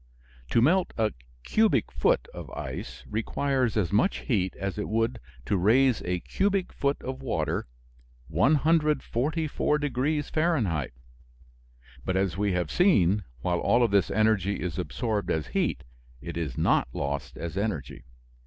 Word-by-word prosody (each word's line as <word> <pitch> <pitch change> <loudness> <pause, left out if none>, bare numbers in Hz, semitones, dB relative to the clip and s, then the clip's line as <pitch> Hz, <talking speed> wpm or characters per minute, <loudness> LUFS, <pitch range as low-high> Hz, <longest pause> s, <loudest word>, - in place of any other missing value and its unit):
To 115 - +3
melt 180 +6 +3
a 110 -2 +2 0.3
cubic 215 - +2
foot 65 0 +1
of - - -8
ice - - -6
requires 125 +2 0
as 90 -6 +1
much 110 - +2
heat 95 - 0
as 100 +2 -4
it 105 - -3
would 115 +2 0 0.3
to 100 - +1
raise 120 +6 +4
a 90 -1 -2
cubic 195 -2 0
foot 140 0 0
of 130 +1 -5
water 130 - -1 0.6
144 150 - +1
degrees 145 +1 -1
Fahrenheit. 120 - 0 1.1
But, 95 - -1
as 95 -3 0
we 100 0 0
have 90 -3 -1
seen, 105 - +3 0.2
while 90 +3 0
all 120 +1 +3
of 115 - +2
this 100 -2 +3
energy 105 -2 +2
is 90 -5 -3
absorbed 110 -4 -2
as 80 -1 0
heat, - - 0 0.4
it - - -7
is 80 -7 -3
not - - +2
lost 70 +1 -3
as 85 0 -5
energy. 90 - -3
110 Hz, 145 wpm, -27 LUFS, 90-140 Hz, 1.1 s, raise